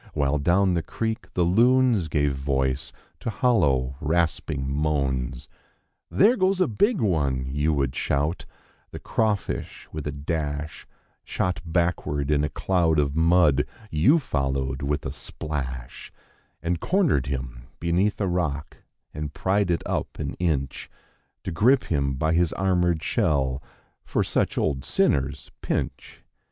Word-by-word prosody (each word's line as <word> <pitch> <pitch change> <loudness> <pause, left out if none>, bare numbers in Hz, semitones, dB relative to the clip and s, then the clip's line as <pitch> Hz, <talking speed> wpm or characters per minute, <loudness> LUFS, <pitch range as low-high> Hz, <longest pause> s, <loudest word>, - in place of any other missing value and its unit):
While 70 +1 +1
down 90 +5 +3
the 85 - +1
creek 110 +6 -4
the 90 - +3
loons 115 +1 +4
gave 75 -2 +1
voice 65 -1 -1 0.3
to 115 - -3
low, 70 - +2
rasping 80 -4 0
moans. 70 -3 -1 0.6
There 220 +6 +4
goes 190 -1 +2
a 185 - +3
big 205 - +2
one!' 70 - +1
you 75 +3 +1
would 70 -3 0
shout, 75 +5 -1 0.6
crawfish 110 -3 -2
with 75 -1 -5
a 75 0 -3 0.5
Shot 90 -1 -2
backward 80 -4 0
in 75 -1 +2
a 75 - 0 0.2
of 80 -5 +3
mud; 80 -4 +4 0.3
you 110 - +4
followed 70 - -2
with 75 +2 -1
a 70 0 -4 0.9
And 85 0 0
cornered 170 - +2
him 65 -3 -5
beneath 90 +5 +1
a 85 -7 0 0.7
pried 100 0 +1
it 85 - 0
up - - -3
an - - -3
inch 70 -6 -1 0.5
To 95 - -4
grip 125 +11 +4
him 70 -4 0
by 80 +4 0
his 85 -1 +2
armored 90 -4 +1 1.2
such - - 0
old 65 -4 0
sinners 70 +1 0
pinch. - - -4
80 Hz, 120 wpm, -25 LUFS, 70-90 Hz, 1.2 s, loons